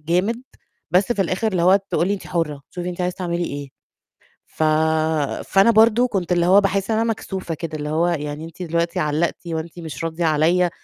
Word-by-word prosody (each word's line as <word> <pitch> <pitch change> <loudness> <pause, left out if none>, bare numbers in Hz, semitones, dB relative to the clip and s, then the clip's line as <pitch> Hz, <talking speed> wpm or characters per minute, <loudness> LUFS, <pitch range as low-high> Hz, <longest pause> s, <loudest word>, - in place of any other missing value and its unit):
جامد، 185 +10 0 0.5
بس 190 +7 +3
في 205 - +1
الآخر 190 +5 -1
اللي 180 -4 0
هو 185 +2 +6
تقول 175 - +1
لي: 205 - +1
"أنتِ 195 - -8
حُرّة، 155 -5 -2
شوفِ 175 -1 -6
أنتِ 180 0 -4
عايزة 180 0 -1
تعملي 175 -1 -2
إيه." 140 -2 -5 0.8
ف 160 - -4 0.8
فأنا 195 +4 +4
برضه 225 +2 +5
كنت 185 -6 -2
اللي 175 -1 +3
هو 195 +3 +6
باحسّ 195 +1 0
إن 220 - +2
أنا 230 0 +1
مكسوفة 190 -5 -4
كده، 155 -1 -5
اللي 150 0 -4
هو 160 +3 +1
يعني 150 -2 -3
أنتِ 165 +2 -11
دلوقتي 170 +2 -1
علّقتِ 155 +3 -1
وأنتِ 165 +1 -5
مش 165 -1 -7
راضية 165 +1 -2
عليّا 165 +3 +3
175 Hz, 200 wpm, -21 LUFS, 160-195 Hz, 0.8 s, هو